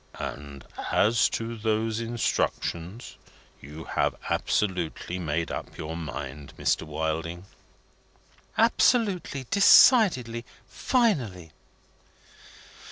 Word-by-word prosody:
"And 70 -2 -7 0.3
as 115 +2 +3
to 115 +1 -4
those 110 0 -1
instructions, 115 -3 -3 0.4
you 75 +4 -9
have - - -1 0.2
absolutely 90 -2 -1
made 80 -1 -2
up - - -6
your 80 +1 -5
mind, 75 -3 -7
Mr. - - +1
Wilding?" 80 +3 -3 1.1
"Absolutely, 210 - +2
decidedly, 185 - +5 0.2
finally." 125 - 0
105 Hz, 80 wpm, -26 LUFS, 80-120 Hz, 1.1 s, decidedly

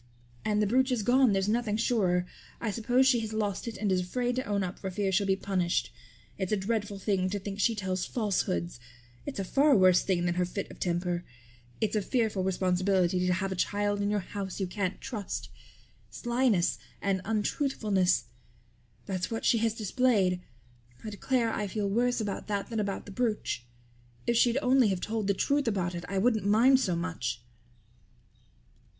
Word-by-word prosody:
And 210 0 +1
the - - +3
brooch 260 +5 +2
is 235 -4 0
gone, 250 +2 +4
there's 195 0 +1
nothing 215 -1 0
surer. 190 -7 +1 0.3
I 225 - -2
suppose 245 +5 +2
she 255 -3 +4
has 220 -1 -4
lost 210 -1 -2
it 230 - -5
and 210 -2 0
is 185 -1 +2
afraid 245 +7 -1
to 255 - 0
own 200 -1 0
up 180 0 -5
for 190 - -4
fear 195 +1 -1
she'll 195 +1 +2
be 190 - +3
punished. 185 -3 -1 0.5
It's 190 0 -2
a 215 - +3
dreadful 205 0 -2
thing 195 -2 0
to 205 - -2
think 200 0 -6
she 230 +2 +2
tells 190 -3 -2
falsehoods. 120 - -1 0.5
It's 285 - -4
a 195 - -1
far 275 +6 +4
worse 185 -1 +6
thing 175 -3 0
than 175 - +1
her 180 +1 +1
fit 195 +3 -5
of - - -13
temper. 175 0 -1 0.6
It's 220 0 0
a 210 - +2
fearful 220 -3 0
responsibility 185 -1 +1
to 180 - +3
have 190 +1 -2
a - - -2
child 205 +2 0
in 200 - 0
your 210 -1 +1
house 195 0 -6
you 195 - 0
can't 185 0 -3
trust. 210 -6 -5 0.6
Slyness 240 -7 +1 0.2
and 195 -2 0
untruthfulness 210 -4 +1 0.8
that's 185 -2 -2
what 225 0 -3
she 230 - +4
has 225 -1 +1
displayed. 210 -5 +1 0.6
I 215 - -5
declare 230 +2 0
I 210 - -2
feel 205 +1 -2
worse 245 +5 +1
about 205 -3 -3
that 205 +1 -2
than 225 - -1
about 200 -2 -2
the 205 - -9
brooch. 210 - -2 0.6
If 235 - +1
she'd 235 +1 +4
only 255 -1 +5
have 190 -3 0
told 215 +1 -2
the 200 - +2
truth 280 +5 +1
about 185 -5 0
it 175 0 -5
I 195 - -2
wouldn't 220 +2 +2
mind 235 +6 +5
so 185 -9 0
much." 125 -9 -3
205 Hz, 190 wpm, -29 LUFS, 185-225 Hz, 0.8 s, worse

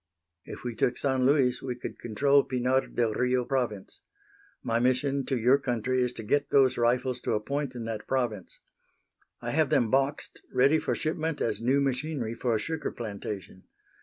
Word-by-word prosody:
If - - -9
we 120 -1 -3
took 120 +2 0
San 130 -2 +1
Luis 130 -3 +3
we 125 -2 -4
could 120 - -7
control 140 +5 +3
Pinar 130 +1 0
del 115 -3 0
Rio 125 +1 +1
province. 120 -8 -3 0.6
My 115 0 0
mission 130 +2 +1
to 135 - 0
your 125 +4 +4
country 125 -1 -1
is 125 -1 +1
to 115 - -7
get 140 +6 +1
those 135 -2 +4
rifles 125 +2 +1
to - - -1
a - - +1
point 140 +3 -3
in 120 -2 -5
that 110 -1 -5
province. 120 -8 -2 0.8
I - - -2
have - - +2
them 115 -3 +2
boxed, 135 +2 0
ready 135 +5 +4
for - - -1
shipment 160 0 -2
as 115 - -1
new 130 +4 +2
machinery 135 -3 -1
for 115 0 -1
a - - 0
sugar 160 +7 -3
plantation. 100 -4 -7
125 Hz, 180 wpm, -28 LUFS, 115-135 Hz, 0.8 s, your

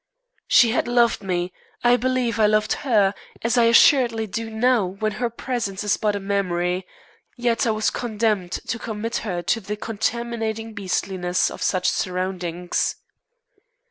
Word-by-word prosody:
She 235 -2 +6
had 240 - 0
loved 240 -2 +3
me. 180 -2 -2 0.3
I 240 0 +5
believe 250 -3 0
I 215 - +5
loved 215 0 +2
her, 210 -7 +3 0.3
as 230 +2 +1
I 240 -2 +5
assuredly 230 -1 +5
do 225 +2 -4
now 230 +1 +2
when 195 +4 -2
her 240 - +1
presence 230 -5 -3
is 205 -1 +2
but 210 -1 0
a - - -2
memory, 185 -2 -1 0.5
yet 240 0 +1
I - - +2
was 215 0 +1
condemned 215 -6 -1
to 230 - -4
commit 225 +1 -3
her 180 -5 -3
to 210 +6 +1
the 210 +2 -4
contaminating 225 0 -3
beastliness 185 -3 -1
of - - -9
such 185 -1 +1
surroundings. 180 -1 -1
215 Hz, 150 wpm, -23 LUFS, 190-235 Hz, 0.5 s, She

